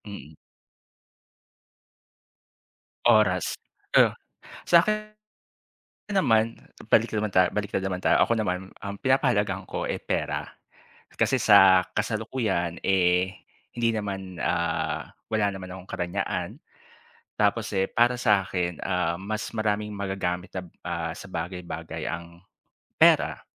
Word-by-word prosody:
Mm. 90 -8 -9 2.7
Oras, 105 -6 +3 0.4
uh, - - +6 0.5
sakin, 215 +5 +3 1.0
naman 115 - +2 0.3
balik 115 +1 +3
na 110 - 0
naman 110 - -1
ta 90 -2 +3
balik 105 -1 -2
na 95 - -1
naman 95 -1 -2
tayo, - - +3
ako - - -1
naman, 95 -2 -3
ang 100 0 -5
pinapahalagahan 105 -7 +1
ko, - - -3
eh, - - -3
pera. - - -2 0.7
Kasi 130 - +2
sa 95 -5 +6
kasalukuyan, 110 -5 -2
eh, 90 -1 +2 0.5
hindi 115 -1 +2
naman, 95 -4 -4
ah, - - -1 0.2
wala 105 -2 +1
naman 95 -1 -8
akong 95 0 -9
karangyaan, 85 0 -3 0.8
tapos, 105 +1 +1
eh 95 - +3
para 120 +5 +2
sakin, 95 -7 0
ah, 90 -2 -1
mas 110 +2 -3
maraming 105 -1 -1
magagamit 95 -2 -3
nab 90 -2 -6 0.2
ah, 85 -1 -2
sa 95 - -10
bagay-bagay 85 -3 -5
ang 85 +1 -7 0.6
pera. - - +5
95 Hz, 115 wpm, -26 LUFS, 90-110 Hz, 2.7 s, uh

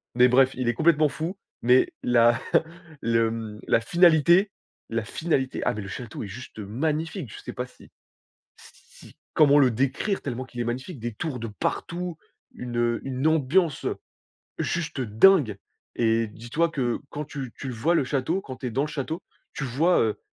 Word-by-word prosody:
mais 125 +1 +6
bref, 130 +1 +5
il 125 -1 -2
est 120 - +3
complètement 155 -2 +4
fou, 165 +7 -4 0.2
mais 125 +2 +4
la 120 0 +4 0.6
le, 115 0 +2
hem, 110 -2 -5
la - - +4
finalité 170 - +5 0.4
la 115 -1 -2
finalité, 135 -1 -1
ah - - +1
mais 105 - -5
le 95 - -7
château 115 +2 -7
est - - -6
juste 110 +2 -10
magnifique, 150 - -2
je - - -9
sais - - -7
pas 125 - -3
si - - -18 0.7
si - - -17 0.2
comment 145 -1 +6
le 130 -3 +5
décrire 135 - -1
tellement 130 -1 -4
qu'il 125 -2 -10
est - - +1
magnifique, 130 +5 -4
des 120 0 -4
tours 130 +1 -4
de 115 - -4
partout, 170 +10 -3 0.4
une, 120 -1 -6
heu, 120 -1 +1
une 135 +2 -3
ambiance 160 0 +2 0.7
juste 165 -5 -2
dingue 115 - +4 0.4
et 115 -1 +2
dis-toi 120 +10 -1
que 125 -6 -1
quand 150 0 -5
tu 135 -5 -6
tu 135 - -7
le 125 - -4
vois 155 +10 +1
le 140 - +3
château, 150 +8 -1
quand 130 -6 -8
tu 130 - -5
es - - -4
dans 135 +4 0
le - - -2
château, 150 +3 -4 0.3
tu 140 - -4
vois, 150 +8 +2
heu, 110 -2 0
130 Hz, 185 wpm, -25 LUFS, 115-160 Hz, 0.7 s, mais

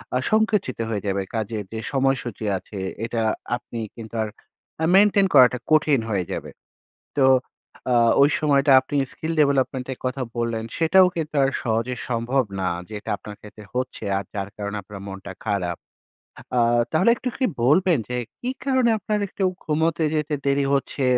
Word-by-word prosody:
আ - - +4
সংকুচিত 215 - +1
হয়ে 105 -3 -2
যাবে। 100 0 0
কাজের 110 -1 -2
যে 110 - -3
সময়সূচি 135 -5 0
আছে 100 +2 -10 0.3
এটা 115 0 -2 0.3
আপনি 120 -1 -7 0.2
কিন্তু 115 -1 -9
আর 110 - -4 0.5
আ - - +4
মেইনটেইন 200 0 +5
করাটা 125 -2 +7
কঠিন 150 -3 +4
হয়ে 100 -4 0
যাবে। - - -4 0.7
তো 140 - +4 0.7
আ - - +4 0.3
ওই 140 - +6
সময়টা 140 -1 +3
আপনি 135 +2 -6 0.2
skill 160 +1 -4
development 135 -2 +1
এর - - -16
কথা 130 +1 -2 0.2
বললেন, 115 -1 -1
সেটাও 185 +3 +5
কিন্তু 155 -2 -4
আর 135 - +3
সহজে 115 +2 -1
সম্ভব 125 +3 +1 0.2
না। 95 - 0 0.2
যেটা 105 -1 -7
আপনার 105 +2 -10
ক্ষেত্রে 105 0 -12
হচ্ছে 130 0 -3
আর 100 - -2
যার 100 -1 -3
কারণে 105 0 -4
আপনার 100 +1 -10
মনটা 95 0 -8
খারাপ। 95 -5 -1 0.8
আ - - +5 0.3
তাহলে 170 +8 +4
একটু 255 - -4
কি 265 - +1 0.2
বলবেন 165 +5 +4
যে, 125 - -2 0.2
কী 250 - -2
কারণে 260 -3 +3
আপনার 210 +1 -1
একটু 195 - -6 0.2
ঘুমোতে 160 +1 +1
যেতে 150 -1 0
দেরি 140 0 +2
হচ্ছে? 140 0 -1
130 Hz, 165 wpm, -23 LUFS, 110-155 Hz, 0.8 s, করাটা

